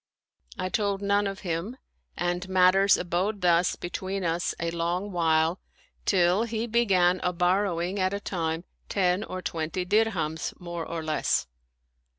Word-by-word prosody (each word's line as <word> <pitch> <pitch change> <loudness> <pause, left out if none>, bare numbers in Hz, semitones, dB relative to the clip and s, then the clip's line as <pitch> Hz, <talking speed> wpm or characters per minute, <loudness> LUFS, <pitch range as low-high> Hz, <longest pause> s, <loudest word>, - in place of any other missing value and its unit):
I 185 - -2
told 200 0 -1
none 200 0 +2
of 195 -1 -5
him, 180 +7 -3 0.4
and 175 +1 -2
matters 190 +1 +5
abode 185 +4 -1
thus 175 0 +3
between 190 +2 -4
us 170 +1 -1
a 170 0 -1
long 175 +4 -2
while 165 0 +2 0.5
till 180 +1 +3
he 225 0 -2
began 195 -6 +3
a 180 - +1
borrowing 180 +1 0
at 185 0 +1
a 200 - -2
time 165 -4 -2 0.3
ten 185 0 +1
or 185 -3 -6
twenty 165 +3 -3
dirhams, 185 -6 0
more 170 -2 -5
or 165 -1 -4
less. 155 -1 0
180 Hz, 145 wpm, -27 LUFS, 170-195 Hz, 0.5 s, matters